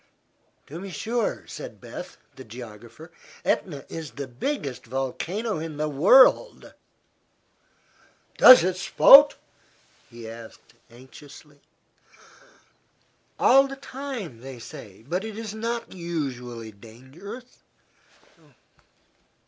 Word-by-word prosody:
"To 160 +4 -9
be 195 - -8
sure," 225 +7 -3
said - - -10
Beth, - - -10 0.2
the - - -11
geographer. 120 +6 -12 0.3
"Etna 145 -7 -2
is 160 -3 -7
the 140 +2 -6
biggest 130 - -5
volcano 160 - -3
in 160 -2 -7
the 155 +1 -1
world." 255 - +4 1.7
"Does 255 - +10
it 185 0 -1
spout?" 285 +9 +7 0.7
he 115 -1 -11
asked, 115 0 -13 0.2
anxiously. 140 +4 -16 1.8
"All 270 +1 +5
the 275 - -8
time, 260 - -8
they 130 +1 -10
say. 110 -3 -12
But 180 +6 -2
it 220 -1 -7
is 220 -2 -6
not 230 +2 -5
usually 130 -10 -6
dangerous." 130 - -13
155 Hz, 100 wpm, -24 LUFS, -, 1.8 s, Does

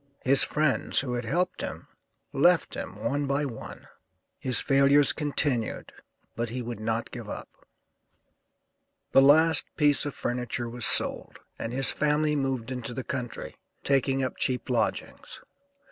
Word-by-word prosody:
His 135 +1 +4
friends, 150 -2 0
who 130 -3 -4
had 120 -1 -3
helped 175 +9 -1
him, - - -6 0.5
left - - +3
him - - -6
one 145 +1 -2
by 140 +2 0
one; 120 -5 -9 0.5
his 125 -3 0
failures 140 +1 +4
continued, 145 -6 -2 0.4
but 120 0 -3
he 125 +2 -5
would 120 -2 -6
not 115 +1 -3
give - - -8
up. - - -10 1.4
The 135 - +6
last 155 +1 +5
piece 145 -2 +3
of 145 - -6
furniture 120 -1 -3
was 120 0 +2
sold, - - +3 0.2
and 115 - -4
his 130 +1 +1
family 150 0 +1
moved 135 -4 -2
into 125 -1 -6
the 130 - -4
country, 125 -3 -5 0.3
taking 135 -1 +1
up 130 - -3
cheap 125 -1 -2
lodgings. 120 - -3
135 Hz, 145 wpm, -27 LUFS, 120-145 Hz, 1.4 s, The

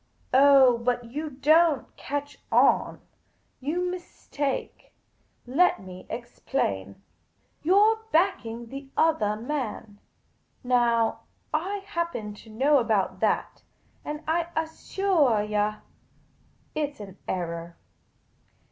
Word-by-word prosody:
" - - -35
Oh, 265 -3 +7
but 245 +1 0
you 295 +7 -5
don't 300 +2 +3
catch 285 0 -5
on. - - +3 0.6
You 305 +7 -2
mistake. 325 -6 -4 0.5
Let 290 +7 +3
me 185 -2 -11
explain. 160 - -3 0.6
You 360 +6 +3
're 440 +2 +4
backing 275 -10 +1
the 275 +1 -8
othah 215 -11 +2
man. 225 -4 -4 0.6
Now, 235 -2 +2 0.3
I 390 +6 -1
happen 335 - -3
to 215 +2 -15
know 270 +6 +3
about 220 -5 0
that, - - 0 0.4
and 300 +1 -5
I 330 +1 +1
assuah 320 - +1
you, 210 0 0 0.9
it 295 -2 -2
's - - -25
an 195 -2 -10
error. 170 -1 -4
265 Hz, 105 wpm, -26 LUFS, 220-315 Hz, 0.9 s, Oh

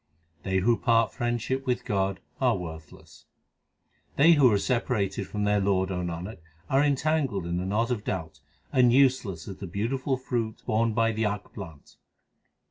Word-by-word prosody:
They 95 0 -1
who 115 +4 +3
part 115 -2 +2
friendship 120 +3 -2
with 125 -1 -1
God 95 -1 -1 0.2
are - - +2
worthless: 80 -3 -10 0.9
They 155 +4 +6
who 140 -7 +6
are 105 - +3
separated 100 -4 -1
from 105 +1 -3
their 105 0 +2
Lord, 95 -1 +1
O 90 - -2
Nanak, 90 +4 -5 0.3
arc 140 +2 +4
entangled 140 - 0
in 85 0 -2
the 90 +1 -2
knot 115 +5 0
of 110 -4 -2
doubt, 80 -6 -4 0.3
And 125 -2 +5
useless 125 -10 +2
as 95 - -7
the 95 - -7
beautiful 130 - -1
fruit 120 -4 -3
borne 115 +1 +1
by 115 0 +3
the 110 0 -1
akk 105 0 -3
plant. 80 -8 -11
110 Hz, 165 wpm, -27 LUFS, 95-125 Hz, 0.9 s, They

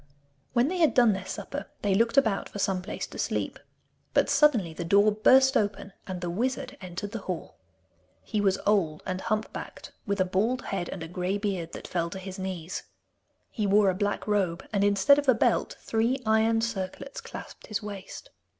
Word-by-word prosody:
When 240 +1 +3
they 360 +3 -2
had 320 -3 +4
done 240 -4 +6
their 190 -1 -5
supper - - -5 0.2
they 200 -2 +2
looked 230 +6 +2
about 220 -7 +3
for - - -8
some 190 -2 0
place 195 - -5
to - - -10
sleep. - - -2 0.6
But - - +3
suddenly 230 - +4
the 175 - -5
door 200 +5 +5
burst 265 +6 +5
open, 200 -2 0
and 185 -2 -5
the 175 - -2
wizard 255 +6 -2
entered 185 +2 -6
the 230 - -4
hall. 185 -4 -6 0.6
He 210 -2 -1
was 195 -2 +3
old 175 -7 +2
and 185 0 -3
hump 215 0 -1
backed, - - -8 0.2
with 200 0 0
a 185 - +4
bald 220 +8 0
head 180 -3 -3
and 180 - -5
a - - -6
grey 180 +3 -2
beard 195 -5 -3
that - - -7
fell 170 -1 -1
to 190 - -7
his 190 0 -7
knees. 185 -2 -4 0.7
He 215 -3 -1
wore 200 0 +5
a - - -3
black 205 +2 -1
robe, 190 -5 0
and 200 -1 +2
instead 205 +8 +5
of 285 -2 0
a 255 - +6
belt - - +1
three 230 +4 +1
iron 220 +1 +3
circlets 225 +4 -4
clasped - - -10
his 215 -1 -3
waist. 200 -2 -8
205 Hz, 195 wpm, -28 LUFS, 185-225 Hz, 0.7 s, done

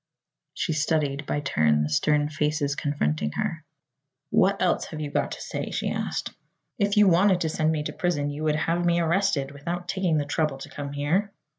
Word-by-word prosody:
She 165 - -1
studied 150 -2 0
by 145 - -1
turn 75 - +2
the 75 - -2
stern 145 - +2
faces 150 -1 -1
confronting 75 - -1
her. - - -2 0.7
"What - - +3
else - - +1
have 155 - -7
you 150 -2 -4
got - - 0
to - - -8
say?" - - -4
she - - -2
asked. - - -3 0.5
"If 205 0 +1
you 210 -1 +7
wanted 185 +1 +4
to 160 - +1
send 155 0 +1
me 155 -2 -1
to - - -4
prison 145 -5 -1
you 145 +2 -5
would 150 -1 +2
have 170 +3 0
me 170 0 +3
arrested, 165 -5 +1
without 170 +5 -5
taking 185 -4 +1
the 145 - 0
trouble 150 -1 0
to 135 - -9
come 140 -1 -6
here." 165 +9 0
150 Hz, 195 wpm, -26 LUFS, 145-170 Hz, 0.7 s, you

